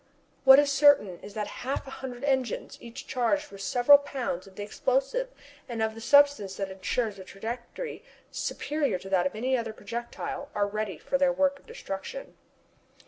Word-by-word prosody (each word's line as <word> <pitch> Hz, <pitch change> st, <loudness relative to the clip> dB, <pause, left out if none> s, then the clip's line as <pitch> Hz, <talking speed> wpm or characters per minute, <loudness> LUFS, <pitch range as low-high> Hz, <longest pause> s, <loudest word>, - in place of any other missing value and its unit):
What 265 Hz, 0 st, +10 dB
is 290 Hz, 0 st, +4 dB
certain 275 Hz, -10 st, +5 dB
is 205 Hz, -, -11 dB
that 210 Hz, -1 st, -1 dB, 0.2 s
half 265 Hz, +3 st, -2 dB
a 270 Hz, -, -9 dB
hundred 255 Hz, -2 st, -7 dB
engines, 265 Hz, -5 st, -1 dB
each 235 Hz, 0 st, -9 dB
charged 280 Hz, +4 st, 0 dB
with 195 Hz, -, -10 dB
several 245 Hz, +8 st, +6 dB
pounds 255 Hz, -10 st, -4 dB
of 190 Hz, -, -16 dB
the 205 Hz, -, -5 dB
explosive 270 Hz, -, 0 dB, 0.4 s
and 235 Hz, -2 st, -4 dB
of 220 Hz, 0 st, 0 dB
the 225 Hz, -, -10 dB
substance 285 Hz, -7 st, +4 dB
that 195 Hz, 0 st, -4 dB
ensures 200 Hz, +2 st, -2 dB
a -, -, -8 dB
trajectory 235 Hz, -, -6 dB, 0.3 s
superior 295 Hz, -8 st, -1 dB
to 190 Hz, +2 st, -10 dB
that 185 Hz, -1 st, +3 dB
of 185 Hz, -, -8 dB
any 255 Hz, +4 st, 0 dB
other 230 Hz, -3 st, -2 dB
projectile, 235 Hz, +6 st, -6 dB
are 205 Hz, -1 st, +2 dB
ready 205 Hz, -3 st, -3 dB
for 275 Hz, -, -1 dB
their 275 Hz, -1 st, +4 dB
work 280 Hz, +1 st, +1 dB
of -, -, -26 dB
destruction. 335 Hz, -, -7 dB
240 Hz, 180 wpm, -28 LUFS, 205-280 Hz, 0.4 s, What